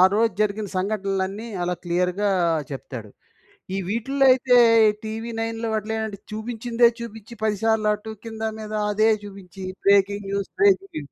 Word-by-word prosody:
రోజు 225 +2 +3
జరిగిన 210 0 0
సంఘటనలన్నీ 195 +1 -2 0.2
అలా 180 0 0
క్లియర్‌గా 180 +3 0 0.4
చెప్తాడు. 125 -5 -7 0.7
ఈ - - -1
వీటిల్లో 270 +6 +1
అయితే 255 -1 +2 0.5
'టీవీ 225 +2 -5
నైన్‌‌‌‌లో' 225 0 -2
అట్ల 215 +1 -7 0.4
చూపించిందే 235 +2 +1
చూపించి, 225 -1 -9
10 215 -1 +1
సార్లు 220 -1 +2
అటు 210 +1 -6
కింద, 220 -1 -7 0.2
మీద 215 0 -7 0.2
అదే 215 +2 +3
చూపించి 195 -2 -10 0.2
బ్రేకింగ్ 200 0 +3
న్యూస్, 200 0 -2
బ్రేకింగ్ 395 -1 +3
న్యూస్. 145 -2 -7
215 Hz, 135 wpm, -23 LUFS, 195-225 Hz, 0.7 s, రోజు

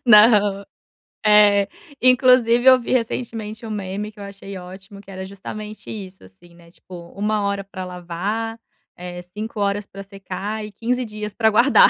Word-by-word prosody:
Não. 210 -3 +6 0.6
É. 205 -1 +6 0.3
Inclusive 250 -1 +5
eu 260 -1 +8
vi 235 - -5
recentemente 225 -2 -2
um - - -6
meme 205 0 -4
que 210 - -19
eu - - -7
achei 200 -1 -8
ótimo 190 +2 -11
que 195 - -14
era 190 0 -6
justamente 210 +2 -8
isso, 195 -3 -8
assim, 170 - -18
né, 170 -1 -18
tipo: 175 -2 -12
1 210 +1 0
hora 200 0 -1
pra 190 -1 -7
lavar, 190 +6 -4 0.4
eh, 175 0 -7
5 210 +5 -7
horas 200 0 0
pra 195 0 -10
secar 195 +2 -5
e 210 - -9
15 245 +4 -1
dias 210 -1 -6
pra 220 0 +3
guardar. 275 - +6
205 Hz, 165 wpm, -21 LUFS, 190-220 Hz, 0.6 s, eu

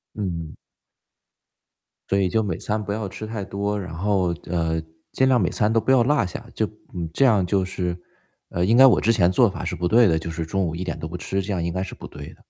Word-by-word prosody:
嗯。 85 -6 -4 1.5
对， 95 -1 +2
就 110 +3 +1
每 95 -6 -2
餐 110 0 -2
不 100 0 -4
要 105 -2 -3
吃 110 - -7
太 110 -2 -4
多。 100 +1 -2
然 90 -3 -7
后 95 -2 +1
呃， 80 -2 0 0.3
尽 130 0 +3
量 125 -3 +4
每 90 - +2
餐 105 0 +1
都 115 - +3
不 130 - -1
要 130 -3 +6
落 140 -1 +2
下， 90 - -7
就 - - 0 0.3
嗯， 85 -2 -3
这 135 - +2
样 105 -7 +4
就 95 +1 +1
是 90 -2 -3 0.5
呃， 90 +1 0
应 115 +5 +3
该 135 +2 +9
我 125 - +5
之 115 - +3
前 90 -5 +3
做 95 - +4
法 - - -6
是 - - -2
不 90 - -2
对 115 +3 +5
的， 80 - +2
就 85 +1 -6
是 80 0 -3
中 95 +4 -1
午 80 - -3
一 90 - -4
点 85 -1 -4
都 80 - -5
不 90 - -5
吃， 95 +3 -2
这 100 +2 -4
样 90 -3 -1
应 85 - -2
该 95 +1 -2
是 95 - -6
不 - - -10
对 75 -1 -9
的。 - - -16
95 Hz, 275 characters per minute, -23 LUFS, 85-110 Hz, 1.5 s, 该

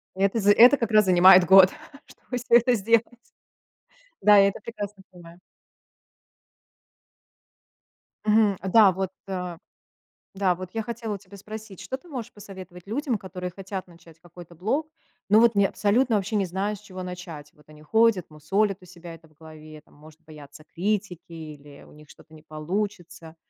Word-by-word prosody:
Это 195 +3 0
з 200 - +3
это 245 +6 +7
как 230 -3 -3
раз 215 -1 +5
занимает 185 0 +7
год, 190 0 +7 0.4
чтобы 250 - -9
всё 235 -1 +3
это 245 +1 +3
сделать. 230 +1 +2 1.2
Да, 210 +1 +6
я 195 0 +6
это - - -6
прекрасно 205 -3 -8
понимаю. 175 -1 -15 2.9
Мгм. 210 -2 +3 0.2
Да, 210 -4 +6
вот, 190 0 -4 0.2
э 180 -3 -5 0.8
да, 190 -2 +1
вот 185 0 -9
я 225 - -3
хотела 225 -2 -5
у - - -7
тебя 200 +1 -16
спросить. 215 -1 -10
Что 260 - -5
ты 350 - -22
можешь 255 -8 -7
посоветовать 190 -4 -12
людям, 250 0 -2
которые 185 -2 -7
хотят 190 +1 -8
начать 165 -2 -19
какой-то 175 0 -15
блог, 265 - -2 0.4
но 210 +2 +5
вот 230 -1 +4
не 200 -1 +3
абсолютно 220 +4 +1
вообще 205 +2 -2
не 200 -2 +1
знают, 195 +4 -3
с - - -21
чего 185 -3 -10
начать? 180 -5 -9
Вот 150 - -25
они 150 0 -16
ходят, 220 +1 +1
мусолят 190 +7 -1
у - - -15
себя 170 -2 -12
это 165 0 -20
в 155 - -28
голове, 155 0 -14
там, - - -26
может 155 +2 -18
бояться 150 -1 -14
критики 190 +1 -3
или 150 -3 -11
у - - -18
них 150 -1 -18
что-то 160 - -19
не 155 -1 -15
получится. 170 +1 -6
190 Hz, 170 wpm, -24 LUFS, 170-210 Hz, 2.9 s, это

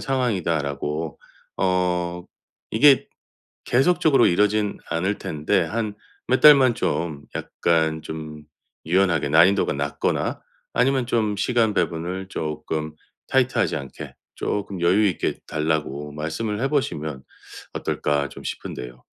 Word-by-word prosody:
상황이다."라고. 80 - -1 0.4
어 90 -2 0 0.5
이게 135 +5 +5 0.6
계속적으로 140 0 +4
이러진 105 +3 +2
않을 95 +5 -1
텐데, 75 +4 0
한 105 +4 -2 0.3
몇 130 +2 +2
달만 135 -5 +8
좀 80 -8 -2
약간 80 -2 0
좀 75 -1 -7 0.4
유연하게 85 -4 +2
난이도가 85 +2 +4
낮거나 70 0 -1 0.3
아니면 130 -1 +2
좀 110 -4 0
시간 115 -3 +1
배분을 90 +3 -2
조금 75 -2 -4 0.3
타이트하지 130 -1 +2
않게 70 - -8 0.2
조금 100 -3 -3
'여유 95 +5 +4
있게 90 - -2
달라고 75 -2 -2
말씀을 105 +8 -3
해 135 - +2
보시면 80 - -2 0.5
어떨까' 70 -1 -1
좀 - - -11
싶은데요. 60 0 -7
90 Hz, 255 characters per minute, -23 LUFS, 75-110 Hz, 0.6 s, 달만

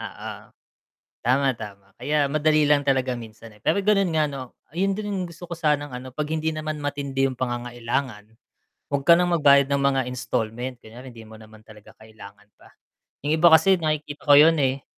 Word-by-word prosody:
Oo. - - -7 0.9
Tama, 135 +3 +2
tama 100 -2 -10
kaya 145 +4 +1
madali 155 0 +2
lang 145 -1 +2
talaga 130 -1 +1
minsan, 115 0 -12
eh, 105 - -20
pero 200 - 0
gano'n 200 -1 +3
nga 155 - +3
'no, 130 -3 -8 0.2
ayun 195 +4 0
din 210 0 -5
yung 190 -2 -2
gusto 170 +1 -13
ko 170 - -5
sanang 150 -2 0
ano, 125 0 -8
'pag 150 -1 -3
hindi 160 0 -1
naman 155 0 -4
matindi 140 -2 -2
yung 130 - -4
pangangailangan, 120 -2 -4 0.6
huwag 140 - 0
ka 170 +4 +6
ng 175 0 +1
magbayad 140 -1 +6
ng 140 0 0
mga 140 -1 +2
installment, 125 0 -4
kunyari 120 +3 -13
hindi 115 -2 -13
mo 110 - -14
naman 110 0 -16
talaga 105 -1 -16
kailangan 105 -2 -15
pa. - - -20 0.6
Yung 145 - 0
iba 175 - +7
kasi 160 +4 +6
nakikita 155 -2 -3
ko 145 - +9
'yun, 160 +2 +6
eh. 135 0 -1
140 Hz, 190 wpm, -23 LUFS, 120-155 Hz, 0.9 s, ko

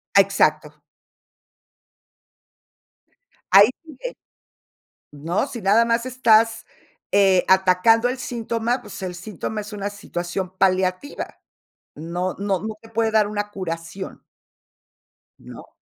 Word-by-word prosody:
Exacto. 155 -6 +3 2.7
Ahí 200 +3 +8
sigue, 320 -2 -13 1.2
¿no? 165 - -2
Si 245 -4 -7
nada 210 +4 +4
más 230 +1 0
estás, 225 -3 +3 0.5
eh, 195 -2 +4
atacando 190 +5 +4
el 255 +1 -3
síntoma, 235 0 -2
pues, 210 -4 -10
el 180 -1 -4
síntoma 205 +4 -5
es 210 +1 -9
una 205 -1 -4
situación 185 -2 -5
paliativa, 185 +7 -1 0.5
no, 175 +4 -3
no, 195 -2 -1
no 220 0 -5
te 225 - -16
puede 225 0 0
dar 215 -1 +3
una 205 0 -3
curación 175 -1 -6 1.2
¿no? - - -12
200 Hz, 105 wpm, -22 LUFS, 185-225 Hz, 2.7 s, Ahí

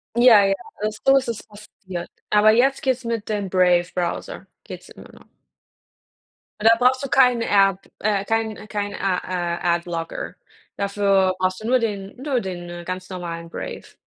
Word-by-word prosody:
Ja, 235 -4 +7
ja, 195 - +2 0.3
also, 215 0 -2
so 270 0 +6
ist 260 - -1
es 230 - -4
passiert. 200 -4 -9 0.2
Aber 210 +1 +5
jetzt 265 +4 +2
geht 260 -2 +1
es 255 - -17
mit 230 -2 -3
dem 205 -3 -2
Brave 180 -1 +3
Browser 175 -1 -3 0.2
geht's - - -10
immer - - -14
noch. - - -17 1.3
Da 225 +2 +6
brauchst 255 +2 +2
du 275 - -4
keine 250 -3 +4
App, 195 -1 +3
äh, 200 -2 0
kein 220 -1 -2
kein 205 -1 -3
a 190 -2 0
a 175 -1 -1
Adblocker. 170 -1 -5 0.4
Dafür 200 -2 +2
brauchst 185 +2 -1
du - - -4
nur 255 +1 +4
den, 200 -3 -4
nur 270 -4 0
den 175 -3 -7
ganz 185 +1 -5
normalen 170 -2 -6
Brave. - - -8
200 Hz, 165 wpm, -22 LUFS, 185-225 Hz, 1.3 s, Ja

